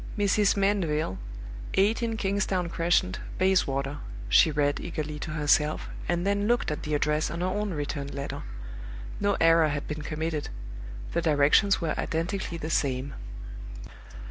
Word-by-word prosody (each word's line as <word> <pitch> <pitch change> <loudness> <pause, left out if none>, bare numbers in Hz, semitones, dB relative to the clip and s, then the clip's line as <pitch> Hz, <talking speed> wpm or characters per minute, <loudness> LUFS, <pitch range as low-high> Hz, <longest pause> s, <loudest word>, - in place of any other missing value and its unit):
"Mrs. 205 0 +3
Mandeville, 170 - +1 0.6
18 225 +3 +2
Kingsdown 195 -3 0
Crescent, 175 +3 +1 0.2
Bayswater," 145 -7 +1 0.3
she 160 - +6
read, 145 -1 +1
eagerly 150 -3 -4
to 165 - -5
herself, 150 0 +1 0.2
and 175 +1 0
then 200 +1 +1
looked 240 -7 +1
at 150 - -3
the 150 0 -1
address 150 +1 +1
on 170 - -4
her - - +1
own 205 +3 -1
returned 145 -1 -4
letter. 140 0 -4 0.8
No 200 -1 +1
error 165 -1 +5
had 145 -1 -3
been 150 0 -4
committed: 155 0 -3 0.6
the 170 - 0
directions 160 +6 +4
were 160 -2 0
identically 170 +2 -2
the 160 0 -4
same. 135 -1 0
165 Hz, 140 wpm, -27 LUFS, 150-195 Hz, 0.8 s, she